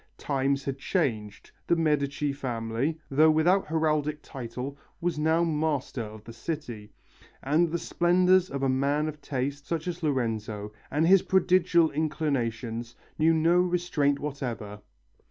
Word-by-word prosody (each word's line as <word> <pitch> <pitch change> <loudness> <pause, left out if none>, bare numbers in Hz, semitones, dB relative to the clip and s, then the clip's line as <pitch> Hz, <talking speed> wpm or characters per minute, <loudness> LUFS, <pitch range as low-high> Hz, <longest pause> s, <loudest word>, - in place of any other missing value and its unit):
Times 140 0 0
had 135 -1 -3
changed, 110 - -2 0.2
the 170 - +4
Medici 150 -3 0
family, 125 +2 -2
though 155 +3 +5
without 170 +5 +3
heraldic 155 -1 0
title, 130 +1 -6 0.2
was 170 -3 -1
now 160 +2 +3
master 150 -5 -1
of 110 -1 -8
the 115 - -10
city, 120 -5 -6 0.5
and 155 +5 +2
the 170 - -1
splendours 180 +2 +3
of 140 0 -4
a - - +3
man 140 +3 +1
of 150 -1 -6
taste, 140 +1 -3
such 165 0 -2
as 175 0 -4
Lorenzo, 110 -7 -2 0.2
and 150 +3 +1
his 190 +2 +6
prodigal 180 -3 +3
inclinations, 120 -7 -2 0.2
knew 160 +1 +5
no 165 +2 +3
restraint 175 -6 +1
whatever. 120 -8 -5
145 Hz, 135 wpm, -27 LUFS, 130-165 Hz, 0.5 s, his